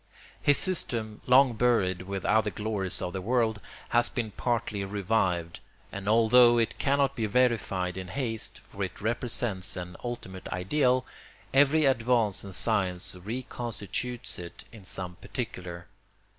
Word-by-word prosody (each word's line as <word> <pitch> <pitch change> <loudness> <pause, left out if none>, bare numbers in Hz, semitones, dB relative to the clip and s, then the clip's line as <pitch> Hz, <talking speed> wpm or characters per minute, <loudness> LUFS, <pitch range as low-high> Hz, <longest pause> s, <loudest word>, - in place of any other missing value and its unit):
His 145 - +4
system, 115 - 0
long 130 0 +6
buried 110 -6 +2
with 95 -2 -4
other 110 -1 +3
glories 105 -3 -2
of 90 - -3
the 95 - -3
world, 110 0 +1 0.3
has 120 0 +3
been 115 -3 -3
partly 115 -3 -1
revived; 95 -4 0 0.3
and 100 +1 -4
although 120 +2 +6
it 115 -1 0
cannot 140 0 +2
be 110 -2 -1
verified 100 -6 +1
in 95 -1 -5
haste, 115 +1 -3
for 100 - -4
it 95 - -5
represents 110 -4 -1
an 90 0 -6
ultimate 105 -7 -6
ideal, 125 +7 +1 0.5
every 145 +3 +5
advance 115 -5 +2
in 100 - -8
science 95 -3 +1
reconstitutes 120 +2 -5
it 85 -1 -9
in 110 -5 -13
some 90 -2 -5
particular. 90 -8 -6
110 Hz, 135 wpm, -28 LUFS, 95-120 Hz, 0.5 s, long